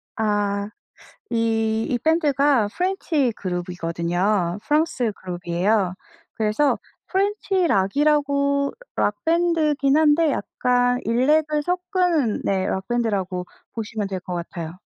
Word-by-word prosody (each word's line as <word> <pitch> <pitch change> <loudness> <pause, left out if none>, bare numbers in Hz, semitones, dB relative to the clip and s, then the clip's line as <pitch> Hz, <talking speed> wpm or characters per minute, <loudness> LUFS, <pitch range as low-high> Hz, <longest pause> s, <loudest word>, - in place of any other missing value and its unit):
아. 205 -1 0 0.6
이 225 -1 +1
이 245 - +1
밴드가 285 -7 +3
프렌치 325 - 0
그룹이거든요. 175 +1 -1
프랑스 295 -7 +1
그룹이에요. 180 +2 0 0.4
그래서 220 +7 +1 0.3
프렌치 390 -2 +1
락이라고 280 +5 +2 0.2
락 210 - +1
밴드긴 315 -4 +2
한데 315 0 +4
약간 245 0 +1
일렉을 295 +6 +2
섞은 360 - 0
네 190 -1 +1
락 190 +3 -3
밴드라고 200 -7 -1 0.3
보시면 215 -2 -3
될 190 -2 -4
것 180 0 -6
같아요. 170 0 -6
235 Hz, 240 characters per minute, -23 LUFS, 195-300 Hz, 0.6 s, 한데